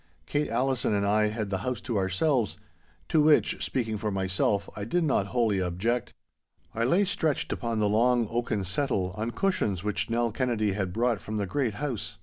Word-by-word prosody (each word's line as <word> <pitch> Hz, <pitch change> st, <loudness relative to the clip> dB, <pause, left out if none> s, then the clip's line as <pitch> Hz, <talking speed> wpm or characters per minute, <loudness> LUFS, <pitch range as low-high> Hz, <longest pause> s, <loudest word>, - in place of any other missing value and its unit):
Kate 145 Hz, +1 st, -1 dB
Allison 125 Hz, -1 st, +1 dB
and 100 Hz, 0 st, +1 dB
I 105 Hz, +1 st, +3 dB
had 105 Hz, -1 st, -3 dB
the 95 Hz, -, 0 dB
house 125 Hz, +5 st, -2 dB
to 120 Hz, -, -3 dB
ourselves—to 95 Hz, -, -1 dB
which, 150 Hz, 0 st, +3 dB
speaking 110 Hz, -4 st, -1 dB
for 105 Hz, -, -1 dB
myself, 95 Hz, +1 st, 0 dB
I 100 Hz, -, -5 dB
did 170 Hz, +12 st, 0 dB
not 130 Hz, -10 st, +1 dB
wholly 110 Hz, -5 st, +1 dB
object. 95 Hz, +7 st, -1 dB, 0.6 s
I 115 Hz, +1 st, 0 dB
lay 180 Hz, +11 st, +3 dB
stretched 160 Hz, -6 st, 0 dB
upon 115 Hz, -2 st, -2 dB
the 105 Hz, -1 st, +2 dB
long 120 Hz, +2 st, +3 dB
oaken 115 Hz, -4 st, -1 dB
settle, 95 Hz, -2 st, -1 dB
on 110 Hz, +3 st, -2 dB
cushions 115 Hz, -, 0 dB
which 105 Hz, +2 st, -1 dB
Nell 115 Hz, 0 st, +1 dB
Kennedy 115 Hz, -3 st, 0 dB
had 95 Hz, -2 st, -2 dB
brought 115 Hz, 0 st, 0 dB
from 105 Hz, +6 st, -4 dB
the 100 Hz, -, 0 dB
great 120 Hz, +1 st, -1 dB
house. 120 Hz, -7 st, -4 dB
110 Hz, 180 wpm, -28 LUFS, 100-125 Hz, 0.6 s, I